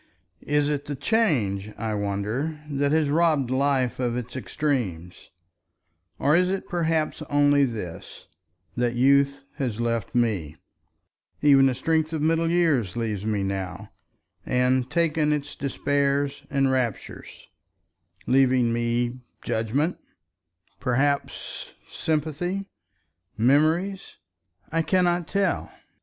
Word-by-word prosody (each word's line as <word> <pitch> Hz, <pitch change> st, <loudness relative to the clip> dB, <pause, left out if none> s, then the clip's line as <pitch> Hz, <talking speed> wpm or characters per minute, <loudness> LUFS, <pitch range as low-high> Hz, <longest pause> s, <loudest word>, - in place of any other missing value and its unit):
Is 145 Hz, 0 st, +2 dB
it 145 Hz, -1 st, -2 dB
the 145 Hz, -, -4 dB
Change, 110 Hz, -, 0 dB
I 110 Hz, 0 st, -2 dB
wonder, 105 Hz, +10 st, -2 dB
that 140 Hz, -1 st, 0 dB
has 155 Hz, -1 st, +2 dB
robbed 150 Hz, -4 st, +2 dB
life 130 Hz, -2 st, +1 dB
of 120 Hz, -1 st, -1 dB
its 125 Hz, 0 st, -6 dB
extremes, 120 Hz, -, -3 dB, 0.9 s
or 145 Hz, +2 st, +3 dB
is 180 Hz, +1 st, +3 dB
it 195 Hz, 0 st, -3 dB
perhaps 165 Hz, -3 st, 0 dB
only 145 Hz, -1 st, +4 dB
this, 105 Hz, -9 st, -7 dB, 0.5 s
that 120 Hz, -1 st, 0 dB
youth 140 Hz, +2 st, +3 dB
has 125 Hz, -6 st, -2 dB
left 115 Hz, -2 st, -2 dB
me—even 120 Hz, -, 0 dB
the 130 Hz, -, 0 dB
strength 160 Hz, +2 st, 0 dB
of 155 Hz, -, -2 dB
middle 165 Hz, +1 st, +2 dB
years 150 Hz, -, +1 dB
leaves 110 Hz, -3 st, -2 dB
me 105 Hz, -2 st, 0 dB
now—and 110 Hz, +6 st, -3 dB
taken 160 Hz, -2 st, +1 dB
its 145 Hz, -1 st, -2 dB
despairs 140 Hz, 0 st, -1 dB
and 135 Hz, -1 st, +2 dB
raptures, 125 Hz, -5 st, -4 dB, 0.8 s
leaving 130 Hz, -2 st, +3 dB
me 120 Hz, +1 st, -1 dB, 0.2 s
judgment, 130 Hz, +10 st, -1 dB, 0.8 s
perhaps, 135 Hz, +6 st, -1 dB
sympathy, 160 Hz, +5 st, -2 dB, 0.7 s
memories? 160 Hz, -, +1 dB, 0.5 s
I 165 Hz, +1 st, +1 dB
cannot 175 Hz, -1 st, +1 dB
tell. 195 Hz, -3 st, 0 dB
140 Hz, 105 wpm, -25 LUFS, 120-155 Hz, 0.9 s, only